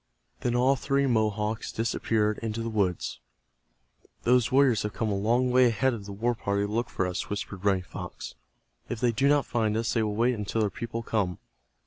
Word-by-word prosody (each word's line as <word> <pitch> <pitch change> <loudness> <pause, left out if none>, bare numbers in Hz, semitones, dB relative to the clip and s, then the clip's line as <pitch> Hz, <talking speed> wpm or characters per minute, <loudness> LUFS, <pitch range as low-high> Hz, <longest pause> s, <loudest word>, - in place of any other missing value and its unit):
Then 120 0 -1
all 130 +3 +4
three 140 +1 +1
Mohawks 110 -3 0
disappeared 110 -1 0
into 115 0 -3
the 115 - -3
woods. 95 -10 -1 1.0
"Those 125 -1 +3
warriors 130 -5 +4
have 105 - -3
come 110 - -1
a 100 - 0
long 120 +5 +2
ways 125 -1 +5
ahead 130 +4 +2
of 105 -4 -6
the - - -6
war 115 +5 0
party 100 -2 -1
to 105 - -5
look 115 +3 -1
for 95 - -1
us," 90 -1 -3
whispered 100 -1 -5
Running 95 -2 +2
Fox. - - -8 0.6
"If 120 - -3
they 120 0 +2
do 135 +5 +2
not 145 -1 +3
find 110 -3 0
us 115 +1 0
they 115 - +2
will 105 -1 -1
wait 120 +3 +2
until 105 0 -2
their 105 -2 +1
people 115 -1 -5
come." 100 -6 -1
110 Hz, 200 wpm, -27 LUFS, 105-120 Hz, 1.0 s, ways